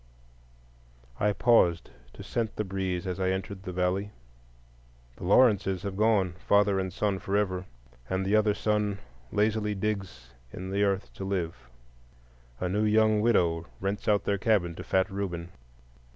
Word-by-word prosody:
I 105 - +3
paused 100 -7 +3 0.2
to - - -10
scent 115 -2 -2
the 105 - -1
breeze 95 -2 -3
as 90 0 -3
I 95 -1 +1
entered 95 +1 -3
the 95 - -6
valley. 90 +3 0 1.1
The - - -7
Lawrences 100 -3 +4
have 100 -2 -4
gone,—father 100 -1 +2
and 95 -1 -2
son 100 0 -1
forever,—and 95 -6 -3
the 100 +2 +2
other 105 -1 +3
son 105 -1 0 0.3
lazily 105 0 +1
digs 95 - -4 0.2
in 95 +1 -6
the 100 +1 0
earth 100 -1 0
to - - -7
live. 90 -9 -3 0.9
A 90 - -1
new 105 +4 0
young 110 0 +3
widow 85 -7 +2
rents 100 +2 -3
out 105 -1 +3
their 100 -1 0
cabin 95 -6 +2
to - - -8
fat 95 +1 +1
Reuben. 90 -3 -4
95 Hz, 145 wpm, -28 LUFS, 90-105 Hz, 1.1 s, Lawrences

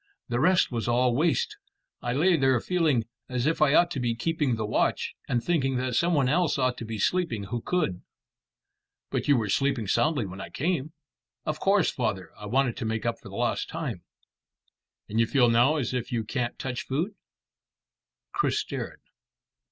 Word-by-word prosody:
The 120 0 0
rest 180 +3 +4
was 115 -2 -2
all 120 0 +3
waste, 425 - +1 0.4
and 120 +1 -1
I - - 0
lay 180 +2 +5
there 135 -4 +3
feeling 155 -7 +1 0.3
as 125 -1 -1
if 160 +1 +1
I 150 -1 +5
ought 175 0 +5
to 140 - -2
be 120 -2 0
keeping 145 0 0
the 110 -1 -2
watch, 105 - 0 0.2
and 120 -1 +1
thinking 135 -6 +1
that 125 0 -1
some 170 +4 +2
one 140 -3 +3
else 165 +3 +2
ought 130 -2 +1
to 115 - -5
be 110 0 -5
sleeping 150 - 0
who 115 +4 -4
could." 130 - -1 1.1
"But - - -1
you 145 -2 +5
were 110 -3 0
sleeping 135 +1 +1
soundly 145 +3 +2
when 95 0 -7
I - - -7
came." 155 -1 -2 0.5
"Of 155 0 -2
course, 195 -3 +3
father. 110 -7 -2
I 105 - -9
wanted 125 +1 +1
to 120 - -3
make 110 0 -2
up 115 -1 -1
for 100 - -12
lost 115 +4 -1
time." 140 - -4 1.1
"And 110 - -1
you 115 - +4
feel 125 -1 +4
now 120 +6 +4
as 130 -5 -1
if 125 -2 -3
you 115 -2 0
can't 120 +2 -3
touch 125 -2 -3
food?" 160 +10 -1 1.2
Chris 400 - +1
stared. - - -4
130 Hz, 190 wpm, -27 LUFS, 115-155 Hz, 1.2 s, lay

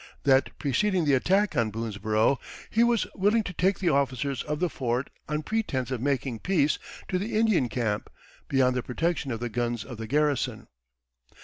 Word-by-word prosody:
That 135 -1 +3
preceding 180 +5 +1
the 145 - +3
attack 190 +8 +2
on 115 -4 +2
Boonesborough, 110 +3 0 0.3
he 230 - +4
was 235 -2 +3
willing 210 +4 +2
to 180 - -6
take 190 +3 +2
the 180 - +1
officers 140 -2 0
of 150 0 -3
the 180 - +2
fort, 130 -3 -2 0.2
on 150 0 -1
pretense 140 - -1
of 125 -3 -2
making 130 -3 -1
peace, 170 - +1 0.3
to 185 - 0
the 210 +2 -2
Indian 215 - +3
camp, 105 -2 -2 0.4
beyond 130 -2 +3
the 125 - 0
protection 160 +4 -1
of 115 - -3
the 120 - -2
guns 120 -1 -2
of 120 -4 -9
the 110 0 -6
garrison." 145 -1 0
140 Hz, 180 wpm, -27 LUFS, 120-180 Hz, 0.4 s, he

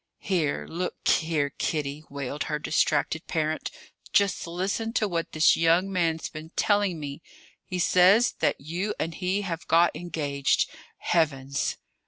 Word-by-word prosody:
"Here, 170 -7 -1
look 180 +2 -4
here, 155 -4 +2
Kitty!" 150 -1 -3
wailed 140 +1 -4
her 150 - -1
distracted 155 +1 0
parent. 155 -1 -1 0.4
"Just 200 -3 +2
listen 195 +6 -2
to 215 - +1
what 170 -3 -2
this 155 +1 +5
young 170 +4 +3
man's 165 -3 0
been 155 0 -9
telling 205 -5 +2
me? 145 +1 -6 0.4
He 185 - -4
says 185 +6 +5
that - - +1
you 175 +8 -3
and 165 - -2
he 185 +4 -1
have 170 -4 -5
got 170 0 +4
engaged! 145 -5 0 0.3
Heavens!" 140 -5 0
165 Hz, 140 wpm, -26 LUFS, 150-185 Hz, 0.4 s, this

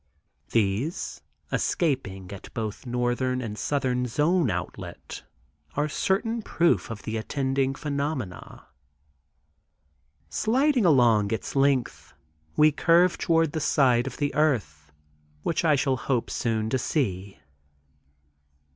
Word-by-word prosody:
These 115 - -1 0.3
escaping 110 - -1
at 100 - -10
both 110 +2 -4
northern 125 +1 0
and 110 -4 -5
southern 125 0 -1
zone 150 +4 +2
outlet, 90 -2 -6 0.5
are 150 +1 +1
certain 220 +8 0
proof 170 -9 +1
of 110 -3 -7
the 110 +1 -3
attending 135 +3 -1
phenomena). 140 - -4 1.6
Sliding 255 +1 +2
along 120 -8 +4
its 110 - -3
length 135 -3 0 0.4
we 155 0 +6
curve 170 +4 +3
toward 165 -2 +2
the 160 - -2
side 130 -4 +3
of 130 - -6
the 145 -1 -1
earth 100 - 0 0.5
which 165 - 0
I 155 -3 +4
shall 135 -1 +1
hope 125 -1 -1
soon 110 -2 -1
to 130 - +1
see. 100 - -2
130 Hz, 110 wpm, -26 LUFS, 115-155 Hz, 1.6 s, we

